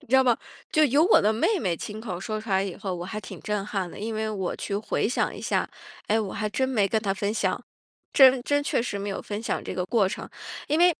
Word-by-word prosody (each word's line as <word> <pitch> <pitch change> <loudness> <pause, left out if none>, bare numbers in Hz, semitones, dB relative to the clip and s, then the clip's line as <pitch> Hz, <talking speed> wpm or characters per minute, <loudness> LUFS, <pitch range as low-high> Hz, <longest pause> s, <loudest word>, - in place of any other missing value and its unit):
你 - - -21
知 255 - +1
道 265 - +7
吗？ 245 -3 +3 0.3
就 310 0 +5
由 285 +3 +4
我 385 - +6
的 210 +2 +3
妹 380 - +2
妹 180 - 0
亲 210 +6 -6
口 185 -6 -5
说 215 +1 -3
出 220 - -11
来 190 -1 +3
以 195 -3 -4
后， 195 -3 -3
我 175 0 -5
还 215 +4 -5
挺 190 - -9
震 210 -2 -2
撼 195 -4 -2
的， - - -10
因 220 +2 -3
为 220 0 -1
我 190 -4 -2
去 200 - -3
回 210 0 0
想 245 - 0
一 - - -8
下， - - 0 0.4
哎， 220 +2 +2
我 200 -3 -4
还 215 - -2
真 260 +6 0
没 220 -7 +2
跟 220 +3 +1
她 200 -3 0
分 200 +2 -2
享， - - 0 0.5
真 265 -2 +7
真 290 +3 +1
确 280 - +1
实 230 -3 -3
没 200 - -3
有 195 - -3
分 210 +1 -5
享 - - -2
这 - - -4
个 180 0 -1
过 200 -1 +3
程。 210 - -6 0.4
因 305 +2 +2
为 355 0 +6
215 Hz, 295 characters per minute, -26 LUFS, 195-245 Hz, 0.5 s, 道